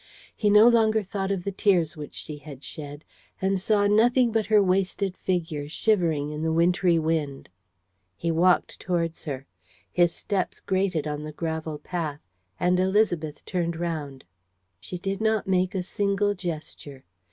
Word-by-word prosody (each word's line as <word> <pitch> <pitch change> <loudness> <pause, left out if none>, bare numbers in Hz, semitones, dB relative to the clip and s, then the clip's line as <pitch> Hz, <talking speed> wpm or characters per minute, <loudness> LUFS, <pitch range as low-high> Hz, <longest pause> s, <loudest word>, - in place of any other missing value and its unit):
He 210 - +1
no 210 +2 +8
longer 220 -2 +4
thought 195 0 -3
of 195 -3 -1
the 200 - -2
tears 180 -5 +2
which 150 -2 -8
she 150 -1 -6
had 145 -2 -11
shed 145 0 -8 0.3
and 190 0 0
saw 205 0 +2
nothing 235 +4 +4
but 220 -2 0
her 215 0 +5
wasted 190 0 +1
figure, 160 -5 -2
shivering 165 -6 +1
in 150 0 -5
the 160 0 0
wintry 175 +1 +3
wind. 155 -4 -1 0.7
He 170 - -1
walked 175 +3 +2
towards 170 -2 -2
her. 135 -3 -5 0.5
His 175 -1 +3
steps 190 +1 -3
grated 190 -5 0
on 150 -1 -3
the 155 - -6
gravel 160 -1 -4
path; 155 -2 -4 0.4
and 180 +1 +2
Élisabeth 185 -6 +1
turned 170 -2 -1
round. 155 -5 -4 0.5
She 180 - -7
did 195 +3 -3
not 220 -1 +1
make 185 +1 +1
a 185 - -1
single 200 +2 0
gesture. 155 -6 -7
180 Hz, 155 wpm, -26 LUFS, 155-200 Hz, 0.7 s, no